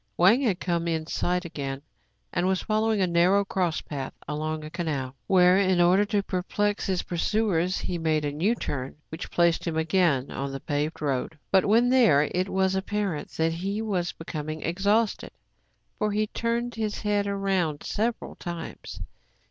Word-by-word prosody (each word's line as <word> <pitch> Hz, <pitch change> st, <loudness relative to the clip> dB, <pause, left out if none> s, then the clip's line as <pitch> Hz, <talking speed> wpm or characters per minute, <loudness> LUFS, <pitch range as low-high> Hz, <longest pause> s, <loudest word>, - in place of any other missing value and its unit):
Wang 200 Hz, +9 st, +5 dB
had 205 Hz, -9 st, +1 dB
come 170 Hz, -2 st, -1 dB
in 160 Hz, -1 st, -1 dB
sight 180 Hz, +2 st, -1 dB
again, 140 Hz, -4 st, -5 dB, 0.5 s
and 175 Hz, +1 st, +1 dB
was 190 Hz, -1 st, +1 dB
following 215 Hz, -1 st, +1 dB
a -, -, +4 dB
narrow 180 Hz, +3 st, +3 dB
cross 180 Hz, -4 st, 0 dB
path 135 Hz, -3 st, -5 dB
along 155 Hz, +1 st, -3 dB
a 155 Hz, -, -8 dB
canal, 145 Hz, -7 st, -3 dB
where, 185 Hz, 0 st, +5 dB
in 185 Hz, -2 st, +3 dB
order 180 Hz, +4 st, +5 dB
to 205 Hz, -1 st, 0 dB
perplex 205 Hz, +2 st, -1 dB
his 185 Hz, -2 st, 0 dB
pursuers, 185 Hz, -1 st, 0 dB
he 175 Hz, -2 st, -3 dB
made 155 Hz, -2 st, +1 dB
a 145 Hz, -, -1 dB
new 180 Hz, +11 st, +1 dB
turn, 135 Hz, -, -4 dB
which 160 Hz, +2 st, -6 dB
placed 170 Hz, 0 st, +2 dB
him 160 Hz, -1 st, -1 dB
again 160 Hz, -5 st, +2 dB
on 140 Hz, 0 st, -3 dB
the 135 Hz, -, -5 dB
paved 150 Hz, +3 st, -2 dB
road. 140 Hz, +2 st, -1 dB
But, 190 Hz, -2 st, +4 dB
when 230 Hz, +4 st, +4 dB
there, 230 Hz, -, +5 dB
it 185 Hz, +2 st, 0 dB
was 190 Hz, 0 st, +1 dB
apparent 190 Hz, -4 st, -2 dB
that 160 Hz, 0 st, +2 dB
he 195 Hz, +5 st, -3 dB
was 190 Hz, -6 st, -1 dB
becoming 155 Hz, -1 st, -6 dB
exhausted; 200 Hz, +6 st, +1 dB, 0.7 s
for 210 Hz, 0 st, +1 dB
he 210 Hz, +1 st, +1 dB
turned 235 Hz, +2 st, -2 dB
his 215 Hz, -2 st, -3 dB
head 205 Hz, -1 st, +1 dB
round 195 Hz, -6 st, 0 dB
several 225 Hz, +2 st, -2 dB
times. 170 Hz, -2 st, -7 dB
180 Hz, 170 wpm, -26 LUFS, 160-205 Hz, 0.7 s, Wang